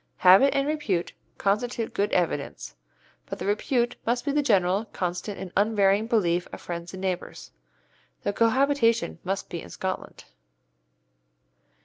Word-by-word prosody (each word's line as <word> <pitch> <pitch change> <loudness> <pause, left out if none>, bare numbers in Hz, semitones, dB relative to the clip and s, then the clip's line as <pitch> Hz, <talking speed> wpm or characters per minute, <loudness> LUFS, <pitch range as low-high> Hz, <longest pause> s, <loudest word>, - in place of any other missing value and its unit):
'Habit 195 +10 +6
and 275 0 +1
repute' 260 - -1 0.2
constitute 225 +3 -1
good 200 +1 0
evidence, 145 - -1 0.5
but - - -5
the 180 - -5
repute 235 +4 0
must 240 +3 -1
be 285 - +1
the 295 +1 +2
general, 200 -5 +2
constant, 180 0 -4
and 185 - -7
unvarying 205 0 +3
belief 180 -7 +1
of - - -8
friends 170 0 -6
and 185 - -8
neighbours. 185 -2 -4 0.7
The 205 - -1
cohabitation 235 -2 +2
must 195 +2 -3
be 170 - -4
in - - -11
Scotland. 190 0 -5
205 Hz, 135 wpm, -26 LUFS, 180-235 Hz, 0.7 s, Habit